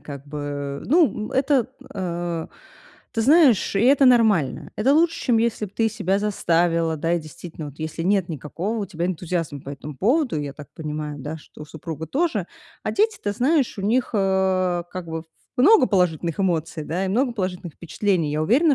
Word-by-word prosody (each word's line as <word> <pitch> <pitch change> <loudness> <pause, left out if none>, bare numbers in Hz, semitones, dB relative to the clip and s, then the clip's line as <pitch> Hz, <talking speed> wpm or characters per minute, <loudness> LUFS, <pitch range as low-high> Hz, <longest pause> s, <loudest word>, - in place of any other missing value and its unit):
как 140 -1 -9
бы, 145 -1 -5
ну, 290 -8 +2
это, 265 -2 +2 0.3
э 175 -3 -3 0.7
Ты 225 - -1
знаешь, 275 - +5
и 195 - +3
это 270 +3 +5
нормально. 220 - +3
Это 260 +7 +3
лучше, 330 +2 +2
чем 240 -4 +4
если 225 -2 0
б 195 - -16
ты 225 -1 +3
себя 200 -3 0
заставила, 170 -5 +1
да, 165 +3 -1
и 170 - 0
действительно, 155 0 -9
вот 145 - -14
если 155 +1 -4
нет 190 -1 +2
никакого 165 - -4
у 200 - -3
тебя 175 0 -3
энтузиазма 165 -5 -3
по 135 - -11
этому 145 0 -8
поводу, 245 - +1
я 140 -1 -5
так 150 0 -11
понимаю, 150 -1 -5
да, 150 +4 -5
что 150 - -13
у - - -7
супруга 160 0 -7
тоже. 270 - 0 0.4
А - - 0
дети, 435 +2 +1
ты 205 - -1
знаешь, 260 0 +1
у - - -3
них, 235 +5 +1
э, 190 -3 +1
как 185 -2 -6
бы 160 0 -4 0.3
в - - +1
много 400 - +7
положительных 175 -2 +1
эмоций, 165 -3 -1
да 180 +5 -2
и - - -2
много 245 +5 +1
положительных 185 -6 -4
впечатлений. 170 -2 -1
Я 155 +1 0
уверена, 275 - +4
185 Hz, 190 wpm, -23 LUFS, 160-230 Hz, 0.7 s, много